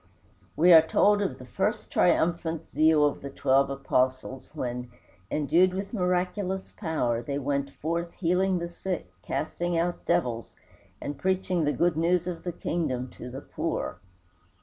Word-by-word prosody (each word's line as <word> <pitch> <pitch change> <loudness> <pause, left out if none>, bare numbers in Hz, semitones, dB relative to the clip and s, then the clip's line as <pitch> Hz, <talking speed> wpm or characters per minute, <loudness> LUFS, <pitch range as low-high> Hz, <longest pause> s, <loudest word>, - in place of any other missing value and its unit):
We 175 +3 +6
are 160 - +10
told 205 +6 +3
of 200 - -1
the 125 - -11
first 210 - -2
triumphant 165 -1 +1
zeal 155 -1 +4
of 145 - -1
the 140 - -6
twelve 135 0 +2
Apostles 130 -1 -1
when, 125 0 -4 0.4
endued 165 +6 +3
with 195 +3 -4
miraculous 185 0 -1
power, 135 - -1
they 140 +4 -3
went 140 0 -1
forth 170 +2 -3
healing 185 +1 +1
the 170 0 -3
sick, 175 +1 -4
casting 175 0 -2
out 175 +1 -1
devils, 125 -10 0 0.4
and 145 -1 -5
preaching 185 -3 0
the 145 - +2
good 170 0 +1
news 170 +1 +2
of 175 -2 -4
the 175 - -2
kingdom 130 -7 -2
to 125 - -9
the 130 +3 -7
poor. - - -3
165 Hz, 150 wpm, -27 LUFS, 140-180 Hz, 0.4 s, are